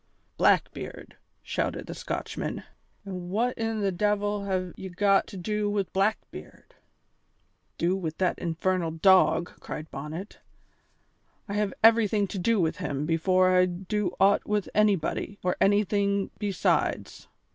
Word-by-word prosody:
"Blackbeard!" - - 0 0.3
shouted - - -2
the - - -7
Scotchman, - - -4 0.4
"an' 180 -2 -6
what 235 +6 0
in 225 -1 -2
the 200 -1 +1
de'il 205 +1 0
have 185 -2 -2
ye 190 - -7
got 195 +2 +2
to 195 - -9
do 210 +3 -1
wi' 205 -1 +1
Blackbeard?" 200 +3 -3 1.0
"Do 175 +2 +1
with 165 -4 -4
that 185 -1 0
infernal 175 +1 -1
dog?" 170 0 +4
cried 155 +1 -7
Bonnet, 155 +8 -7 1.1
"I 200 - -5
have 205 -2 -1
everything 220 -2 +5
to 195 - -4
do 225 +4 +2
with 160 -3 0
him 145 -5 -3
before 185 +3 +3
I 180 0 +5
do 185 +1 -3
aught 195 +1 +4
with 210 -2 0
anybody 205 -1 +1
or 180 0 +1
anything 200 0 +2
besides. 200 -4 -1
195 Hz, 135 wpm, -27 LUFS, 180-205 Hz, 1.1 s, everything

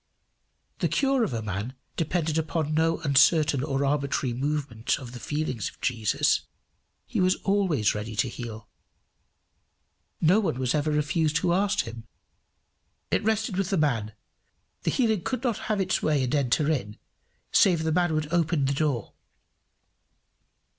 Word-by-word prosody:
The - - +2
cure 270 -3 +2
of 220 - -1
a 115 -2 -3
man 105 +5 -4 0.2
depended 165 -1 0
upon 155 -1 -2
no 160 +1 +2
uncertain 145 -1 +4
or 140 -1 0
arbitrary 140 -3 0
movement 135 -3 -1
of 125 -3 -9
the 125 - -8
feelings 145 -5 -2
of - - -20
Jesus. 115 -4 +1 0.6
He - - -2
was 185 0 +3
always 190 - +2
ready 110 +1 -5
to 120 - +1
heal. 115 -3 -7 1.5
No 180 +6 +4
one 165 - -1
was 130 -2 0
ever 150 0 +1
refused 150 +1 +1
who 170 +2 +1
asked 200 +2 +2
him. 115 0 -9 1.0
It - - +1
rested 220 -2 0
with 195 -1 0
the 195 - +1
man: 115 -9 0 0.7
the - - -1
healing 220 -7 +1
could 255 +7 -3
not 235 -5 0
have 215 -2 +1
its 185 -1 0
way 150 -3 +2
and 125 - -2
enter 145 +2 +2
in, 105 -8 -3 0.5
save 175 -5 +4
the 160 - 0
man 175 -1 +2
would 155 +1 -2
open 165 -4 +2
his 140 +1 0
door. 140 -8 -1
150 Hz, 155 wpm, -26 LUFS, 125-175 Hz, 1.5 s, uncertain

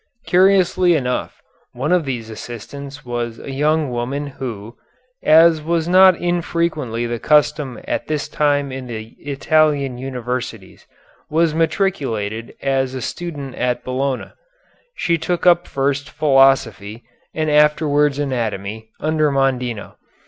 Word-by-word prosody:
Curiously 185 -1 +4
enough, 125 -4 -3 0.3
one 130 +7 -2
of 180 -3 +3
these 120 -4 -4
assistants 135 +6 -9
was 120 -1 -3
a 135 - -8
young 150 +1 +1
woman 125 +4 -3
who, 120 -5 -7 0.5
as 160 0 +5
was 165 +1 -1
not 185 +1 +7
infrequently 170 -8 -1
the 120 0 -3
custom 150 -4 +2
at - - -2
this 150 -1 -2
time 145 -2 0
in 130 -1 -6
the 110 -2 -6
Italian 145 -2 +1
universities, 125 -5 -5 0.4
was 160 0 +2
matriculated 130 - -1
as 135 -1 0
a - - -3
student 145 -3 -5
at 125 -1 -1
Bologna. 130 +1 -2 0.6
She 170 -1 0
took 175 +2 -2
up 175 0 +5
first 140 +1 -1
philosophy, 135 -7 +2 0.3
and 155 -1 0
afterwards 150 -1 +3
anatomy, 110 -6 -3
under 155 -1 +1
Mondino. 125 -5 -1
140 Hz, 120 wpm, -19 LUFS, 125-155 Hz, 0.6 s, not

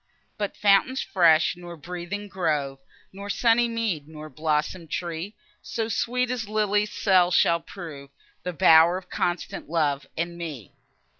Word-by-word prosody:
But 205 -2 -4
fountain 205 +5 +4
fresh, 170 -9 +3
nor 175 -1 -10
breathing 180 +5 -6
grove, 150 -8 -2 0.3
Nor 200 +1 -8
sunny 235 +3 +3
mead, 220 -11 -2
nor 155 -1 -10
blossom'd 155 +3 -2
tree, 175 +5 -4 0.3
So 225 -2 -3
sweet 250 +3 0
as 230 -4 -3
lily's 210 -1 +1
cell 185 -3 +3
shall 170 -1 +3
prove,— 160 -5 -10 0.3
The 180 - -4
bower 165 +3 +6
of 185 -1 -11
constant 175 -4 -3
love 150 -4 0
and 170 +1 -3
me. 145 - -7
175 Hz, 140 wpm, -25 LUFS, 160-205 Hz, 0.3 s, bower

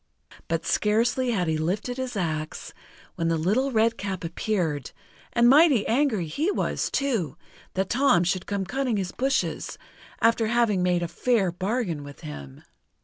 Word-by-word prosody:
But 165 0 -2
scarcely 235 +4 +1
had 190 -7 0
he 160 -1 0
lifted 200 +10 -2
his 260 -2 -4
axe, 155 -4 -3 0.4
when 165 - -2
the 165 0 +1
Little 215 +12 +1
Redcap 220 -5 0
appeared, 165 - -2 0.4
and 235 0 +4
mighty 280 -4 +6
angry 235 - +1
he 290 - -1
was, - - -1
too, 215 - -1 0.4
that 190 0 -1
Tom 245 -9 +4
should 180 +1 -1
come 200 -1 -2
cutting 255 +1 -1
his 185 -2 -2
bushes, 270 +1 -1 0.4
after 230 -1 +3
having 225 -5 +2
made 180 -1 +1
a - - -1
fair 210 -1 +1
bargain 185 - -2
with 145 -1 -11
him. 70 -3 -9
200 Hz, 150 wpm, -25 LUFS, 170-240 Hz, 0.4 s, mighty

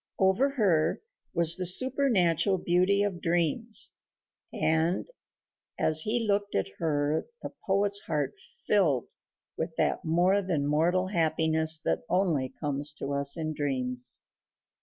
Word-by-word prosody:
Over 190 +9 +2
her 200 - +1 0.4
was 170 0 +5
the 185 - -3
supernatural 200 - +2
beauty 185 +3 +1
of 190 -4 -3
dreams 175 +7 +1 0.6
and 160 +3 0 0.7
as 155 0 +3
he 230 +5 0
looked 205 0 -1
at 95 - -1
her 150 -1 -1 0.2
the - - -7
poet's 200 +1 +1
heart 150 -7 -3 0.3
filled 160 - +1 0.5
with - - -4
that - - -1
more 180 +5 +2
than 170 -7 -2
mortal 170 +5 +1
happiness 160 -2 +1
that - - 0
only 165 -9 0
comes 145 0 -2
to 140 - -5
us 140 +2 +3
in 155 -1 -3
dreams. 130 -4 -1
170 Hz, 125 wpm, -28 LUFS, 150-195 Hz, 0.7 s, was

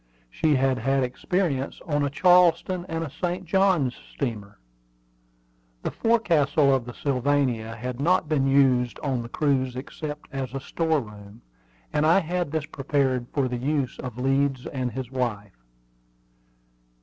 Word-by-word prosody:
She 150 - +2
had 130 -1 +2
had 135 +3 +1
experience 140 +2 -1
on 145 -4 0
a 140 - +1
Charleston 180 +2 +3
and 165 0 -2
a 160 - -5
St. 180 +3 -3
Johns 175 -8 +2 0.2
steamer. 110 -7 -4 1.3
The - - -2
forecastle 155 -11 +3
of 130 -3 0
the 120 - -7
Sylvania 130 -5 0
had 125 +2 -5
not 175 +3 +2
been 145 -3 +1
used 130 -3 +3
on 135 -4 -1
the 120 - -8
cruise 130 -4 0
except 150 +3 -6
as 135 -2 -4
a - - -1
store 160 +2 0
room, 105 0 -13 0.5
and 150 - +2
I 160 +3 +5
had 175 -2 -2
this 155 -2 -1
prepared 135 -4 -1
for 140 -3 0
the 125 -1 -3
use 140 0 -1
of 125 -3 -6
Leeds 135 0 +1
and 130 -2 -3
his 130 -1 -6
wife. 105 - -3
135 Hz, 150 wpm, -25 LUFS, 125-155 Hz, 1.3 s, I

